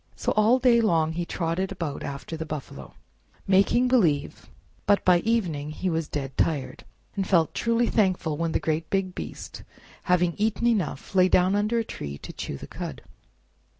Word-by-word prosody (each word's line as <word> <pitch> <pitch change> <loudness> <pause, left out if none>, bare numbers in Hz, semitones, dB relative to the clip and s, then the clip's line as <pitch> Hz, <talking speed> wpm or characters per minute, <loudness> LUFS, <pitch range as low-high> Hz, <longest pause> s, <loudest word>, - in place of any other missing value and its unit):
So - - -1
all 215 +4 +4
day 245 -2 +4
long 165 -7 +2
he 170 +1 -3
trotted 175 +3 -2
about 165 -7 -4
after 140 +3 -6
the 160 - -4
buffalo, 145 - -8 0.5
making 200 +6 +3
believe; 175 - +1 0.4
but 205 0 +3
by 180 -1 +5
evening 175 -10 -1
he 180 +4 -2
was 165 -1 -1
dead 135 -3 -5
tired, 135 -5 -1 0.3
and 195 -2 -2
felt 165 -4 +3
truly 230 +1 +1
thankful 185 -9 +1
when 165 +1 -1
the - - +1
great 160 0 -2
big 195 -2 -1
beast, - - -7 0.4
having 180 -1 +2
eaten 220 +2 0
enough, 200 - -1
lay 185 -1 +5
down 185 +1 +3
under 210 +3 +1
a 230 - +1
tree 70 - -6
to - - -10
chew - - -5
the - - -9
cud. - - -7
180 Hz, 175 wpm, -26 LUFS, 155-210 Hz, 0.5 s, by